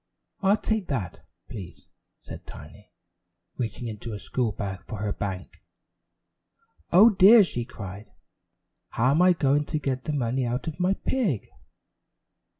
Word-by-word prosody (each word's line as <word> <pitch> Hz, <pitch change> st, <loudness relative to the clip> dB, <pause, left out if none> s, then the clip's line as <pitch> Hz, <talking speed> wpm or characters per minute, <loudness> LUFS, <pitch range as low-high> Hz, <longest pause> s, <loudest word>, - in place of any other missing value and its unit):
"I'll 200 Hz, +1 st, +4 dB
take 220 Hz, -2 st, -2 dB
that, 105 Hz, -, -4 dB, 0.2 s
please," 95 Hz, -5 st, -10 dB, 0.3 s
said -, -, -11 dB
Tiny, 105 Hz, +8 st, -13 dB, 0.7 s
reaching 120 Hz, 0 st, -4 dB
into 110 Hz, 0 st, -6 dB
her -, -, -4 dB
school 115 Hz, +2 st, -2 dB
bag 95 Hz, -2 st, -5 dB
for 110 Hz, -, -6 dB
her 105 Hz, 0 st, -2 dB
bank. 95 Hz, -2 st, -6 dB, 1.3 s
"Oh, 210 Hz, +6 st, +8 dB
dear," 205 Hz, +3 st, +8 dB
she 120 Hz, -9 st, -3 dB
cried, 100 Hz, -3 st, -9 dB, 0.8 s
"how 125 Hz, +4 st, +1 dB
am 155 Hz, +5 st, +3 dB
I 180 Hz, 0 st, +6 dB
going 145 Hz, -2 st, +1 dB
to 155 Hz, -, -2 dB
get 135 Hz, -3 st, -3 dB
the 155 Hz, -, -2 dB
money 130 Hz, -1 st, 0 dB
out 120 Hz, +1 st, -2 dB
of 160 Hz, +1 st, -6 dB
my 185 Hz, +2 st, +2 dB
pig?" 200 Hz, -, -1 dB
130 Hz, 145 wpm, -26 LUFS, 105-175 Hz, 1.3 s, Oh